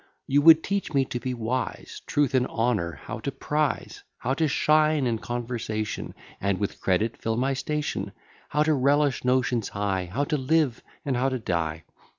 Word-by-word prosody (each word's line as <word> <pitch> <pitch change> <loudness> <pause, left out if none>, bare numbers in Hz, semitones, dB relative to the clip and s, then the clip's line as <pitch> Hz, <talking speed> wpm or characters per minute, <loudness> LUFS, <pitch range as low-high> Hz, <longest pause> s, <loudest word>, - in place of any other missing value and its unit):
You 140 +2 +3
would 160 +1 +8
teach 195 -6 -2
me 135 -1 +4
to 120 - -4
be 125 0 -3
wise: 120 +2 -3
Truth 145 -3 +1
and 130 -1 +3
honour 110 -8 0
how - - -6
to - - -3
prize; 150 -1 -2 0.2
How 130 - -1
to 160 +3 +1
shine 155 0 +3
in 115 -2 0
conversation, 115 -3 -4 0.2
And 100 -1 0
with 100 0 -3
credit 105 +5 +1
fill 115 0 -1
my 135 +3 +1
station; 150 +2 -2 0.4
How 150 +1 +2
to 155 0 +2
relish 140 0 +2
notions 125 -3 +1
high; 100 -2 -1
How 135 +8 0
to 150 +1 0
live, 140 -2 +1 0.2
and 135 -3 0
how 130 +2 +2
to 130 - -2
die. 85 -7 -2
130 Hz, 175 wpm, -26 LUFS, 115-145 Hz, 0.4 s, would